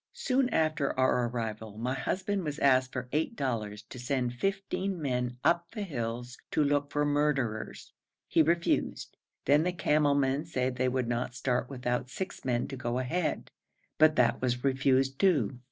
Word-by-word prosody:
Soon 260 -1 +1
after 155 - 0
our 125 -2 +3
arrival 110 -3 -5
my 125 +3 -1
husband 190 +8 -1
was 150 -2 -3
asked 130 -2 +3
for 125 0 -4
eight 160 +9 0
dollars 110 - -3
to 125 - -11
send 125 -1 -1
fifteen 195 +4 -2
men 125 -4 -1
up 170 0 +2
the 210 0 -5
hills 125 - -4
to 155 - +2
look 145 0 +1
for 145 0 +1
murderers; 145 -7 -1 0.3
he - - +4
refused, 170 +2 0 0.3
then 145 +2 +5
the 180 +2 +1
camel 150 -4 +2
men 140 +1 +1
said 130 -6 -2
they 130 +1 +1
would 125 -1 -1
not 120 +1 -2
start 125 -1 -1
without 125 -2 -2
six 190 +7 -5
men 120 -2 0
to 135 - -6
go 120 -1 -2
ahead, 155 +7 -2 0.5
but 155 0 +6
that 125 -2 +3
was 125 -1 -1
refused 135 0 +2
too. 165 -9 +2
135 Hz, 170 wpm, -30 LUFS, 125-155 Hz, 0.5 s, but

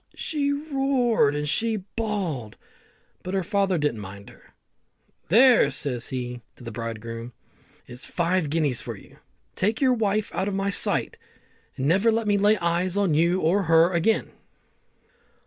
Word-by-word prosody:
She 285 -2 -1
roared 270 - +1
and 150 0 -2
she 225 +9 0 0.2
bawled, 190 - -3 0.6
but 185 +1 -4
her 190 - 0
father 195 -1 +1
didn't 145 -7 -1
mind 100 0 -10
her. - - -22 0.7
"There," 235 - +6
says 130 -4 -2
he 125 -1 -5
to - - -15
the 115 - -6
bridegroom, 115 +1 -6 0.5
"is 125 0 -10
five 170 -2 0
guineas 150 -5 0
for - - -7
you. - - -17 0.4
Take 215 +4 0
your 260 -2 +3
wife 215 -2 -1
out 190 - -1
of 200 - -2
my 195 +1 -1
sight, - - 0 0.6
and 130 - -2
never 195 +9 +3
let 225 0 0
me 205 -1 +2
lay 210 +2 +4
eyes 175 +1 0
on 200 -5 +2
you 170 +4 +2
or 185 +5 +2
her 165 +2 +5
again." 175 +6 +1
185 Hz, 155 wpm, -25 LUFS, 140-215 Hz, 0.7 s, There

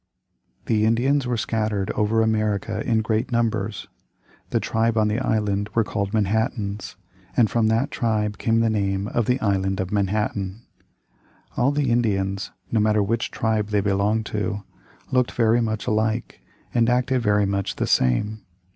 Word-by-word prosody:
The 110 -2 +2
Indians 130 +4 +2
were 120 -1 0
scattered 105 -3 -1
over 110 +2 +1
America 110 -1 0
in 110 -2 +1
great 110 +3 -1
numbers. 110 -4 -1 0.6
The - - +1
tribe 115 0 0
on 105 -1 +3
the 105 +3 0
island 105 -4 0
were 115 - +4
called 100 -2 -3
Manhattans, 105 -1 -1 0.4
and 115 -4 +4
from 115 -2 +2
that 115 +5 +1
tribe 105 -3 -1
came 115 0 +2
the 115 - +2
name 100 -1 -1
of 120 -3 0
the 125 +1 +2
Island 95 -2 0
of 95 -1 -2
Manhattan. 100 0 -1 0.9
All 125 +3 +2
the 145 -4 0
Indians, 100 -4 0 0.2
no 115 - +2
matter 105 -1 +3
which 115 +3 -1
tribe 110 -2 0
they 105 -1 +1
belonged 105 +2 +1
to, 105 -1 -3 0.5
looked 125 -1 +2
very 115 0 +3
much 110 -2 -2
alike 110 +2 -1 0.3
and 115 -1 +3
acted 125 +1 +1
very 105 -2 +2
much 100 -1 -2
the - - -1
same. 105 - +1
110 Hz, 155 wpm, -23 LUFS, 100-115 Hz, 0.9 s, were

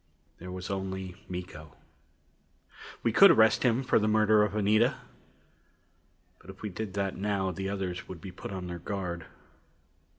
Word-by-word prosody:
There 90 +1 -8
was 90 +2 -6
only 95 -1 -4 0.2
Miko. 90 -4 -8 1.3
We 115 - +2
could 195 - +8
arrest 110 -9 +5
him 125 +1 +2
for 125 - +3
the 105 - 0
murder 110 0 +4
of 105 -1 0
Anita. 105 +1 +3 1.4
But - - -17
if 95 +2 -11
we 105 - -2
did 100 +1 -6
that 100 -1 -1
now, 100 -1 -1
the 95 +2 -4
others 95 -3 -4
would 90 - -8
be 95 +3 -8
put 90 - -8
on 95 -2 -5
their 90 -1 -6
guard. 85 -3 -4
95 Hz, 160 wpm, -29 LUFS, 90-105 Hz, 1.4 s, could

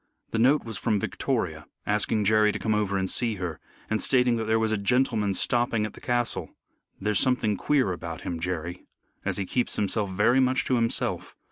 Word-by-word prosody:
The 115 - -1
note 135 +6 +4
was 110 -4 -5
from 105 -3 +1
Victoria - - -2 0.2
asking 105 +1 +1
Jerry 105 +1 +4
to - - -4
come 110 - 0
over 105 -2 0
and 95 0 0
see 115 +2 +1
her, 90 -5 -5 0.3
and 110 -1 0
stating 125 -2 +3
that 110 - -2
there 110 +1 +2
was 110 -1 +1
a - - +2
gentleman 110 -2 +1
stopping 120 -2 +1
at 110 - -6
the - - -14
castle. 120 -1 -1 0.5
"There's 105 0 +1
something 125 -5 +2
queer 130 -1 +1
about 85 -2 -6
him, 85 -2 -4
Jerry, 90 0 -4 0.4
as - - -1
he 100 - -2
keeps 125 +6 -1
himself 105 0 0
very 110 +7 +3
much 130 +1 +2
to 130 - +1
himself. 115 -1 -1
110 Hz, 200 wpm, -26 LUFS, 100-120 Hz, 0.5 s, note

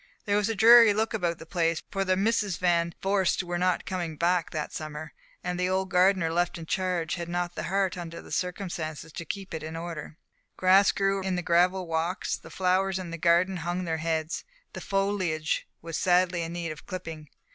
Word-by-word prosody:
There 205 - +1
was 210 +1 +1
a 225 - -1
dreary 230 0 +8
look 220 +2 0
about 175 -6 -1
the - - -11
place 165 -1 0
for 195 -1 0
the 185 -1 +1
Misses 205 -2 +1
Van 170 -2 +1
Vorst 195 -1 +2
were 175 0 -3
not 180 0 +1
coming 175 -4 -3
back 175 0 +1
that 155 -1 -4
summer, 155 0 -6 0.3
and 180 0 -3
the 180 0 +1
old 190 0 -1
gardener 180 -2 +3
left 175 +1 0
in 165 - -8
charge 180 -2 -1
had 170 -1 -4
not 175 0 -2
the - - -4
heart 190 -1 0
under 170 -1 -7
the - - -13
circumstances 170 -4 -4
to 170 - -6
keep 195 0 -6
it 160 - -4
in 160 +1 -6
order. 165 -2 -6 0.4
Grass 190 +2 +5
grew 195 0 0
in 190 -1 -1
the 180 - -2
gravel 180 +2 +3
walks, 165 +3 -1
the - - -12
flowers 190 +1 +1
in 180 -3 -6
the 170 - -4
garden 175 +3 +3
hung 175 +2 -2
their 165 -1 -1
heads, 160 0 -2 0.3
the - - -7
foliage 190 -6 -1 0.2
was 165 -1 -4
sadly 180 -1 +3
in 165 0 -4
need 170 -2 -3
of 155 - -10
clipping. 165 -5 -7
180 Hz, 205 wpm, -27 LUFS, 165-190 Hz, 0.4 s, dreary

